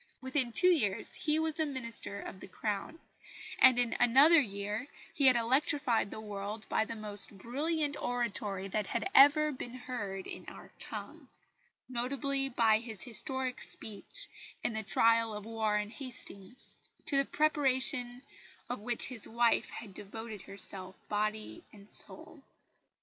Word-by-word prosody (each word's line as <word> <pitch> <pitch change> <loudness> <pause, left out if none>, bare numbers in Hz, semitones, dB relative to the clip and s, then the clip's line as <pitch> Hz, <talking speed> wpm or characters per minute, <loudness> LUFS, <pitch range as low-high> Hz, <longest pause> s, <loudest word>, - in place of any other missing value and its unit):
Within 260 -1 -1
two 360 +10 +5
years 210 - +1
he 305 0 +1
was 320 0 -1
a 315 - +2
Minister 230 -7 -2
of 190 - -8
the - - -9
Crown; 210 - -4 0.6
and 255 - +7
in 245 -1 +1
another 280 +8 +7
year 205 +2 -4 0.3
he 280 -2 +4
had 255 - +8
electrified 250 -1 +2
the - - -7
world 210 0 -5
by 220 - +2
the 230 - -5
most 205 -2 -4
brilliant 295 - -1
oratory 210 -5 -2
that 210 0 -2
had - - -1
ever 295 +2 +7
been 255 -2 -7
heard 205 -7 -5
in - - -8
our - - -11
tongue - - -7 0.6
notably 270 +2 -1
by 225 -3 +3
his 225 -4 -4
historic 255 +2 +3
speech 220 - -2 0.4
in - - -1
the 220 - -2
trial 230 +1 +2
of 210 0 -7
Warren 215 -2 -1
Hastings, 245 -4 -5 0.3
to 280 - 0
the 275 - +4
preparation 260 -4 +1 0.5
of 245 - -3
which 235 +3 -1
his 245 -5 -2
wife 235 0 +2
had 210 -4 -7
devoted 210 +1 -8
herself 195 -1 -7
body 215 +9 -2
and 200 -1 -16
soul. - - -7
235 Hz, 145 wpm, -32 LUFS, 210-270 Hz, 0.6 s, had